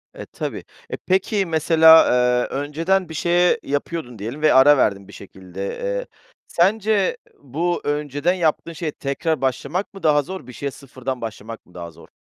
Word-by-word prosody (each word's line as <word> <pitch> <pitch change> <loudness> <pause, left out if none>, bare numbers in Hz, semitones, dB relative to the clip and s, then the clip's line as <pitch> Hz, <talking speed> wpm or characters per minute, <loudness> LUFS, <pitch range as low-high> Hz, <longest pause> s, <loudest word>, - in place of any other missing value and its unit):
E, - - -8
tabii. - - -6 0.3
E, - - -4
peki, 190 +2 0
mesela, 160 0 +6 0.4
eee, - - -3
önceden 165 +6 -1
bir - - -7
şey, 175 +3 +2
eee, - - +2
yapıyordun 140 -4 -4
diyelim 120 +9 -6
ve 155 -1 +4
ara 140 +3 +7
verdin 100 -6 0
bir 100 - -14
şekilde, 95 0 -9
eee, - - -4 0.4
sence 200 +2 +1 0.2
bu 160 +6 -2
önceden 145 +3 -1
yaptığın 170 -1 -1
şeye 160 -1 -4
tekrar 145 +3 -3
başlamak 140 +10 -2
mı 195 - -12
daha 150 -2 +4
zor? 185 -2 -8
Bir 125 - -10
şeye 140 +3 -4
sıfırdan 130 -1 -7
başlamak 115 0 -8
mı 90 - -23
daha 85 -1 -8
zor? 80 - -17
150 Hz, 170 wpm, -21 LUFS, 130-175 Hz, 0.4 s, ara